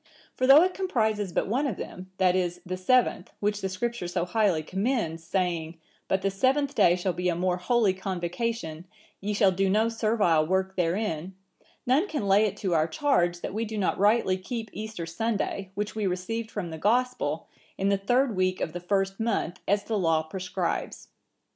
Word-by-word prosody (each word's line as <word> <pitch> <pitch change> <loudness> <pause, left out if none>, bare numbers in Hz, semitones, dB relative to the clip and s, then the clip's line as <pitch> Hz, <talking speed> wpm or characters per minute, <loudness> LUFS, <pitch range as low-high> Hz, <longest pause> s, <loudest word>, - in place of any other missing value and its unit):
For 255 - +1
though 285 +5 +9
it 365 0 +1
comprises 220 - 0
but - - 0
one 260 +8 +1
of 230 - -3
them, 185 +1 -8
that 185 -1 +3
is, 180 -1 -1
the 185 0 -3
seventh, 210 -1 +2
which 210 0 -1
the 190 - -2
Scripture 235 +1 -3
so 175 0 -1
highly 180 -4 +1
commends, 190 - -1
saying,(964) 170 -2 -2 0.3
'But 190 0 0
the 195 - +1
seventh 270 +7 +1
day 175 - +5
shall 180 0 -1
be 180 +1 -1
a 170 - 0
more 180 +1 0
holy 220 0 +2
convocation, 185 -1 -3 0.3
ye 210 +2 -2
shall 200 -2 +4
do 195 +1 +1
no 215 +4 +3
servile 215 -9 +2
work 190 +1 0
therein,' 180 0 -1 0.5
none 275 +10 +3
can 290 - -3
lay 200 +2 +5
it 205 -1 -2
to 190 -4 -1
our 160 -1 +3
charge, 175 - +1
that - - -5
we 220 +2 -1
do 220 -1 -5
not 195 -2 0
rightly 205 -2 +3
keep 225 +2 -5
Easter 215 -5 -5
Sunday, 200 +1 -2
which 210 +1 -3
we 215 -2 -1
received 205 +5 -3
from 190 -7 -5
the 160 - -7
Gospel, 210 -8 0 0.3
in 195 +1 +1
the 200 - +4
third 245 +4 +1
week 185 0 +1
of 155 - -3
the 175 - -4
first 195 +2 -1
month, 205 -6 -1
as 200 +1 +2
the 220 -1 -1
Law 165 -3 +2
prescribes. 185 +3 -4
195 Hz, 190 wpm, -27 LUFS, 180-225 Hz, 0.5 s, though